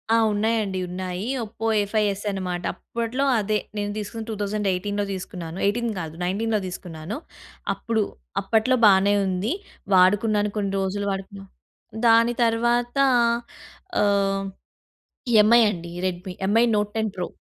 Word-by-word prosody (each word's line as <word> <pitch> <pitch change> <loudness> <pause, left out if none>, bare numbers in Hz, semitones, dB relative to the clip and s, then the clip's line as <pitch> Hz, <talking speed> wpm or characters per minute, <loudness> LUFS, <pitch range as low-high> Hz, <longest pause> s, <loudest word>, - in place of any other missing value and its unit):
ఆ! - - +5 0.2
ఉన్నాయండి. 210 -2 0
ఉన్నాయి. 180 +1 -4 0.2
ఒప్పో 225 +1 -5 0.2
ఏఫై 210 +1 0
ఎస్ 200 - -9
అనమాట. 180 -2 -3
అప్పట్లో 235 +3 -3 0.2
అదే. 215 +1 0 0.2
నేను 205 0 -2
తీసుకున్నది 215 +2 -5
2018లో 205 -1 -1
తీసుకున్నాను. 175 -2 -6
18 235 +3 +1
కాదు, 160 -2 -5
19లో 215 +4 0
తీసుకున్నాను. 175 - -6 0.6
అప్పుడు 225 -2 -1 0.4
అప్పట్లో 225 +3 +2
బానే 200 0 +5
ఉంది. 190 +4 -1 0.4
వాడుకున్నాను 205 +3 +4
కొన్ని 200 -2 -1
రోజులు 195 +1 -2
వాడుకున్నా. 195 +1 -6 0.6
దాని 230 +1 +5
తర్వాత 235 +2 +1 1.1
ఆహ్, 195 -1 +2 1.0
ఎంఐ 235 +3 +6
అండి. 170 -3 -6
Redmi. 180 0 -4
MI 225 +3 +4
note 210 0 -1
ten 220 -1 0
pro. 180 - -3
205 Hz, 120 wpm, -24 LUFS, 190-225 Hz, 1.1 s, ఎంఐ